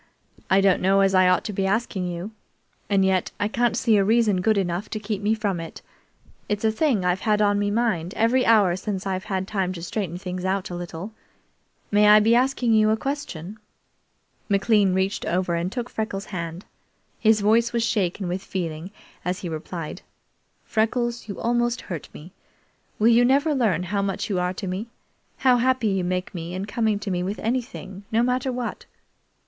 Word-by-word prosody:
"I 190 +1 +5
don't 195 -2 +3
know 195 +1 +4
as 195 0 +3
I 185 -1 +5
ought 185 - +2
to 210 - -4
be 195 0 0
asking 195 -3 -1
you, 175 +4 -5 0.6
and 195 -2 +3
yet 190 -1 +1
I 205 - +1
can't 235 +1 0
see 225 -3 +3
a 200 - +4
reason 215 -3 +3
good 215 +2 +2
enough 180 +1 -1
to 215 - -4
keep 210 -1 -4
me 210 +2 +2
from 205 -5 -2
it. 165 -1 -8 0.7
It's 210 +1 -1
a 220 - +4
thing 220 - +1
I've 180 +1 +1
had 210 0 +1
on 205 -1 +3
me 205 0 0
mind 205 -6 -1
every 240 +3 +3
hour 210 -7 +4
since 190 0 -4
I've 190 0 -2
had 190 -3 -2
time 190 -3 -1
to 170 -2 -8
straighten 180 -2 -3
things 180 -1 -5
out 190 0 -1
a - - -4
little. 175 +4 -7 0.8
May 210 0 +5
I 210 0 +8
be 220 +2 +3
asking 250 -1 +2
you 215 -1 +4
a 220 - +2
question?" 220 - -5 0.9
McLean 200 -1 +3
reached 190 +2 0
over 180 0 0
and 170 +2 -1
took 245 0 -4
Freckles' 215 -4 -4
hand. 170 +1 -5 0.5
His 220 -1 +4
voice 230 +3 +3
was 235 -1 0
shaken 195 -4 -1
with 180 +2 -2
feeling 170 -2 -4 0.3
as 180 +3 -2
he 175 - -4
replied: 160 0 -6 0.6
"Freckles, 235 +1 -1
you 200 - -6
almost 240 +1 0
hurt 170 -6 -7
me. 165 +5 -12 0.7
Will 220 +2 +4
you 235 +1 +5
never 280 +5 +3
learn 210 - +1
how 200 +3 -1
much 195 +1 -2
you 185 - +1
are 180 0 0
to 195 - -5
me 190 +5 -4 0.5
how 255 -2 +4
happy 250 -2 +2
you 195 -2 0
make 180 +1 -2
me 170 0 -5
in 190 +1 -3
coming 215 0 0
to 200 -1 -4
me 180 -1 -1
with 195 +3 -3
anything, 225 -5 -4
no 225 +1 +3
matter 250 +1 0
what?" 245 -1 -5
200 Hz, 195 wpm, -24 LUFS, 185-225 Hz, 0.9 s, I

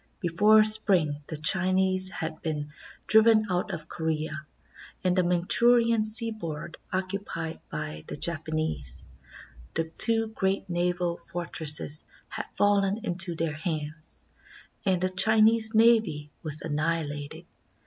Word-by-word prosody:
Before 210 +4 +4
spring 195 -9 +4
the 155 - -5
Chinese 185 +3 +2
had 160 -5 -6
been 150 -2 -5 0.3
driven 220 0 +5
out 180 0 -2
of 160 -1 -7
Corea, 155 -1 -4 0.6
and 180 -1 +1
the 185 - +3
Manchurian 230 +6 +3
seaboard 215 -9 -1
occupied 185 -4 -5
by 155 0 -6
the - - -7
Japanese. 155 - -3 0.7
The 165 - 0 0.2
two 225 -1 +2
great 195 -2 -2
naval 175 0 -2
fort 175 -1 -8
resses 150 -1 +4 0.2
had - - -6
fallen 205 +2 +1
into 175 -2 0
their 165 -1 -3
hands, 155 0 -4 0.6
and 185 -2 +2
the 185 +1 -1
Chinese 220 +3 +3
navy 220 -10 +2
was 155 -1 +1
annihilated. 150 -2 -4
175 Hz, 120 wpm, -26 LUFS, 155-210 Hz, 0.7 s, driven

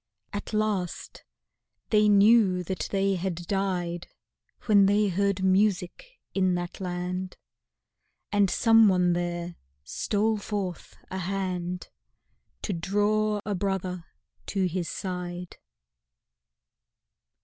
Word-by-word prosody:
At 205 - -5
last 215 -5 -2 0.7
they 210 -1 +5
knew 205 -2 +5
that 180 -3 -3
they 195 0 +1
had 180 0 -2
died 180 -3 -2 0.6
When 200 -3 +5
they 205 +1 +3
heard 200 +1 0
music 200 - +1 0.2
in 185 -2 +2
that 175 0 -5
land, 180 0 -4 0.9
And 205 -2 +3
someone 200 -7 +5
there 175 0 -3 0.3
stole 215 - 0
forth 195 -4 -5
a 190 - -3
hand 180 -2 -3 0.7
To 205 - -1
draw 205 +4 +1
a 210 - -1
brother 185 -2 -2 0.4
to 195 -2 0
his 180 -1 -2
side. 180 -1 -5
190 Hz, 100 wpm, -27 LUFS, 180-205 Hz, 0.9 s, they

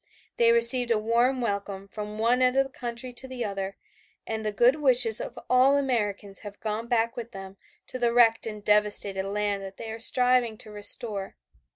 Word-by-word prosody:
They 230 -1 +4
received 235 +1 +7
a 230 - +2
warm 235 +4 0
welcome 200 -3 -4
from 210 +1 -8
one 235 +3 +1
end 255 +1 +2
of 270 - +4
the 270 - -12
country 245 0 -7
to 265 +2 -6
the 255 -2 -5
other 195 -1 -5 0.5
and 220 0 -5
the 215 - -2
good 240 +7 +2
wishes 250 -6 +4
of 245 - -8
all 260 +3 +3
Americans 210 -7 -2
have 205 -1 -11
gone 220 +1 -4
back 230 -1 0
with 235 -1 -8
them 195 0 -10 0.3
to 255 - -8
the 240 -1 +1
wrecked 230 -2 +3
and 210 -2 -8
devastated 205 -2 +1
land 205 0 -2
that 195 0 -10
they 225 -1 -7
are 225 - -8
striving 250 -1 +2
to 215 - -11
restore. 205 -1 -1
225 Hz, 195 wpm, -25 LUFS, 205-245 Hz, 0.5 s, received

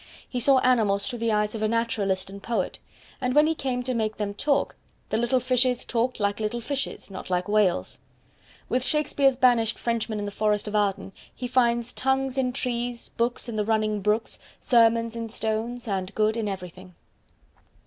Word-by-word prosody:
He 250 - -3
saw 270 +3 +5
animals 215 -6 +3
through 240 -2 -4
the 230 0 +1
eyes 210 0 +1
of 220 - -5
a 215 - +2
naturalist 215 -4 0
and 200 0 -9
poet; 220 -5 -2 0.4
and 250 0 0
when 300 +1 +6
he 320 - +2
came 255 -5 -2
to 255 +1 -2
make 220 -2 -1
them 205 -1 -2
talk, 280 +7 0 0.3
the - - 0
little 240 +3 +2
fishes 250 0 +1
"talked 240 +1 -1
like 205 0 0
little 220 +2 -2
fishes 270 -3 -4
not 190 - -8
like 180 +1 0
whales". 205 - +1 0.7
With 250 0 +1
Shakespeare's 285 -2 +2
banished 240 -3 +3
Frenchman 230 -2 -2
in 205 - -3
the 205 - -4
Forest 210 0 0
of 210 - -3
Arden, 200 -2 0 0.2
he 250 - -4
Finds 240 -1 +1
tongues 265 0 0
in 250 -1 +1
trees, 245 -2 -3
books 240 +1 -1
in 230 -2 -4
the 210 - +1
running 215 -1 0
brooks, 210 +3 0 0.2
Sermons 230 -1 +3
in 230 -1 -4
stones, 225 +2 -3
and 190 -2 -3
good 215 0 +2
in 225 -2 -2
everything. 185 -1 -7
230 Hz, 185 wpm, -26 LUFS, 210-250 Hz, 0.7 s, when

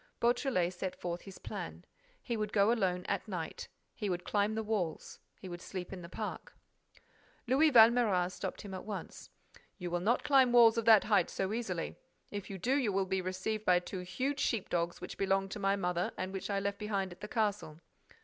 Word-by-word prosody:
Beautrelet 235 -7 +1
set 180 +1 -5
forth 175 0 -3
his 195 -2 -11
plan. - - -7 0.4
He 240 - -2
would 215 -1 -2
go 200 +2 +4
alone 185 -6 0
at - - -2
night; 175 -6 -5 0.3
he 205 - -3
would 180 -1 -2
climb 205 +2 +1
the 220 - -1
walls; 200 -7 -3 0.2
he 190 - -9
would 175 -1 -7
sleep 185 -1 -6
in 185 - -7
the 170 - -9
park— - - -6 0.9
Louis 280 +5 +4
Valméras 220 -6 +5
stopped 185 0 -5
him 200 -2 -8
at 185 - -5
once: 205 -3 -7 0.5
"You 180 -2 -5
will 175 - 0
not 220 +8 +1
climb 270 -4 +5
walls 235 -2 +7
of 225 - -3
that 220 -3 +8
height 210 -2 +3
so 195 +2 -2
easily. 190 -8 -3 0.3
If 205 -1 -5
you 195 - -5
do, 240 +9 0
you 265 -7 +2
will 195 0 +1
be 190 0 -1
received 185 +4 -3
by 180 -3 +5
two 180 +1 -4
huge 255 +11 -2
sheep 225 -8 0
dogs 170 0 -1
which 180 - -8
belonged 195 0 +1
to 210 - -5
my 195 0 +2
mother 180 -2 -1
and 185 +1 -4
which 195 0 -4
I 200 -1 +1
left 200 0 -2
behind 200 -3 -2
at 175 - -13
the 210 - -5
castle." 205 -8 -1
195 Hz, 205 wpm, -33 LUFS, 180-220 Hz, 0.9 s, that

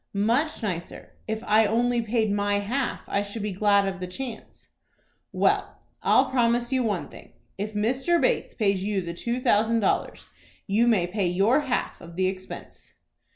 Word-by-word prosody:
"Much 235 +9 0
nicer. 175 -5 -5
If 220 +1 -3
I 215 0 +4
only 240 +2 +1
paid 225 -1 0
my 205 0 +1
half, 245 +7 -2
I 200 - 0
should 205 +1 -6
be 210 - -2
glad 200 +1 +3
of 190 -1 -4
the 180 - -4
chance." 230 +5 -8 0.6
"Well, - - +1 0.2
I'll - - +3
promise 240 -1 +1
you 260 -1 +2
one 210 -7 -1
thing. - - -14 0.3
If 210 +1 -4
Mr. 260 +11 +1
Bates - - 0
pays 195 -4 +1
you 200 -1 0
the 170 0 -5
two 235 +8 -3
thousand 230 -2 +2
dollars, 195 - -1 0.4
you 220 +4 +2
may 210 -7 +3
pay 190 +1 -1
your 195 +10 +3
half 270 -4 -2
of 170 0 -11
the 185 +1 +1
expense." 185 0 -6
215 Hz, 170 wpm, -26 LUFS, 195-240 Hz, 0.6 s, I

